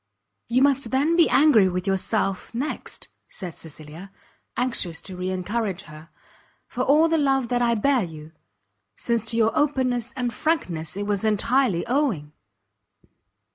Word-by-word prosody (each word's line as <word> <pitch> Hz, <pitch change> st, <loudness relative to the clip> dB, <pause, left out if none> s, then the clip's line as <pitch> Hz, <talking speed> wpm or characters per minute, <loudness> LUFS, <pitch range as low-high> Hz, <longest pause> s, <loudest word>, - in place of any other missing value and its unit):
"You 250 Hz, +3 st, +3 dB
must 275 Hz, -4 st, +2 dB
then 285 Hz, +6 st, +2 dB
be 340 Hz, -1 st, +5 dB
angry 245 Hz, -11 st, +5 dB
with 180 Hz, 0 st, -3 dB
yourself, 195 Hz, +1 st, -1 dB
next," 275 Hz, +6 st, -4 dB, 0.2 s
said 180 Hz, -4 st, -8 dB
Cecilia, 160 Hz, +4 st, -10 dB, 0.5 s
anxious 235 Hz, -9 st, -1 dB
to 190 Hz, -, -7 dB
re 180 Hz, +1 st, -3 dB
encourage 195 Hz, +1 st, -2 dB
her, 155 Hz, +1 st, -13 dB, 0.6 s
"for 250 Hz, -, -5 dB
all 300 Hz, +5 st, +4 dB
the 325 Hz, -1 st, +1 dB
love 270 Hz, -4 st, +1 dB
that 245 Hz, 0 st, +1 dB
I 235 Hz, -1 st, +2 dB
bear 260 Hz, +3 st, +2 dB
you; 155 Hz, -2 st, -9 dB, 0.6 s
since 235 Hz, -2 st, -1 dB
to 230 Hz, +1 st, -3 dB
your 225 Hz, -1 st, +3 dB
openness 255 Hz, -4 st, 0 dB
and 245 Hz, -2 st, -2 dB
frankness 180 Hz, -, -2 dB
it 205 Hz, -, -2 dB
was 205 Hz, -1 st, -1 dB
entirely 220 Hz, -2 st, +2 dB
owing." 235 Hz, -, -1 dB
230 Hz, 145 wpm, -24 LUFS, 185-265 Hz, 0.6 s, be